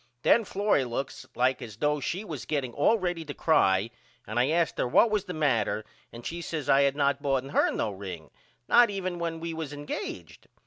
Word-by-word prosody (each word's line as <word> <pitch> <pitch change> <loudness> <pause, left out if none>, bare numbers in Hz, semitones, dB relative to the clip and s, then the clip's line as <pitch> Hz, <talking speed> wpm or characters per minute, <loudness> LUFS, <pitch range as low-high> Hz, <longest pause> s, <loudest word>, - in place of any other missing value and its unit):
Then 230 -1 +4
Florrie 200 -7 +1
looks 130 +2 -5
like 125 +2 +1
as 110 -4 -8
though 150 +6 0
she 180 +9 -3
was 155 - -6
getting 135 -5 -2
all 185 - +3
ready 175 -4 -2
to 145 -2 -7
cry 100 - +3 0.3
and 110 +3 -2
I 125 +3 +3
asked 165 +1 +1
her - - +1
what 200 - +4
was 210 -2 0
the 180 - -5
matter 115 -8 +1 0.3
and 120 0 -11
she 170 +1 -4
says 155 -4 -4
I 135 - +5
had 140 0 +2
not 140 -1 +1
boughten 135 -2 0
her - - +3
no 105 - -1
ring 95 -5 -8 0.4
not 240 -1 +6
even 185 -3 -3
when 165 -1 -3
we 165 0 -4
was 160 -3 -5
engaged. 95 - -6
145 Hz, 210 wpm, -28 LUFS, 125-170 Hz, 0.4 s, not